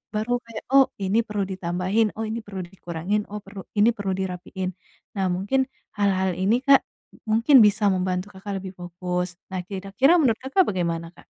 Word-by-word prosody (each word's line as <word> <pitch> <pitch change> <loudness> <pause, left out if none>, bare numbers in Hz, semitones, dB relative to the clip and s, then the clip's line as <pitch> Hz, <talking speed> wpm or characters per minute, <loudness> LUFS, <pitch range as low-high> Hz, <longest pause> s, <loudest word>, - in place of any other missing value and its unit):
baru 235 +3 +1
kayak, 230 -1 -8
"Oh, 270 -1 +7
ini 195 +3 +2
perlu 210 -2 -2
ditambahin, 185 +4 0
oh 225 - -3
ini 220 +2 -3
perlu 195 -2 -6
dikurangin, 180 +3 -3
oh 210 0 -5
perlu 195 -1 -10
ini 210 +3 +6
perlu 195 -2 -1
dirapiin." 185 0 -4 0.5
Nah, 190 - +2
mungkin, 205 +9 +1 0.3
hal-hal 190 -2 +2
ini, 220 +7 +2
Kak, 275 0 +7 0.5
mungkin 230 +5 +6
bisa 205 0 +3
membantu 185 +1 -1
Kakak 195 0 -5
lebih 190 - -6
fokus. 180 0 -3 0.2
Nah, 185 - -2
kira-kira 200 - +2
menurut 235 -6 +2
Kakak 275 +9 +3
bagaimana, 170 -3 -2
Kak? - - -18
195 Hz, 170 wpm, -24 LUFS, 185-220 Hz, 0.5 s, Oh